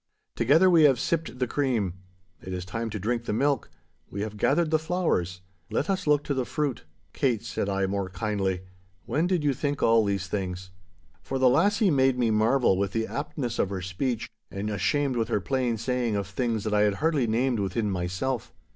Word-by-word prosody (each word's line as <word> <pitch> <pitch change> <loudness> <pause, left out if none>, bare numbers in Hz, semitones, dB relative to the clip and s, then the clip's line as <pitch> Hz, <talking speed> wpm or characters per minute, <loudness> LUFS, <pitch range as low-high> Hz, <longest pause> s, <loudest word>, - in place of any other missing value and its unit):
Together 145 +10 +4
we 170 -3 +6
have 135 -5 +5
sipped 165 -6 -1
the 125 - +1
cream. 120 -8 0 0.5
It 95 - -6
is 90 -1 -4
time 115 +5 -3
to 105 - -4
drink 115 +4 -2
the - - -2
milk. 140 - +1 0.4
We 100 - -5
have 105 0 -4
gathered 160 +9 +2
the 155 - +3
flowers—let 95 - -2
us 185 -3 -2
look 145 -1 +4
to 145 - -1
the 130 -2 0
fruit.' 140 - -2 0.3
'Kate,' 125 -7 0
said 100 - -2
I, 95 0 +1
more 95 0 -2
kindly, 95 -1 -1 0.4
'when 160 +4 0
did 180 -4 +1
you 145 -2 +2
think 145 +2 -2
all 115 -1 +5
these 100 -2 -1
things?' 95 -1 -4 0.5
For 135 - -3
the 130 -1 +5
lassie 205 - +3
made 135 -2 +3
me 120 -3 +2
marvel 110 -1 +3
with 100 -1 -1
the 115 0 0
aptness 135 -4 -4
of 95 - +2
her 95 -2 -4
speech, 110 +6 -2 0.2
and 100 +2 -4
ashamed 135 +5 0
with 115 - 0
her - - +1
plain 120 +4 -1
saying 120 -1 -1
of 100 -1 -1
things 110 +2 -2
that 110 - -2
I 105 - +4
had 105 -1 +3
hardly 150 -2 +1
named 120 +1 +1
within 100 +2 -1
myself. 95 +8 -2
115 Hz, 200 wpm, -27 LUFS, 100-140 Hz, 0.5 s, we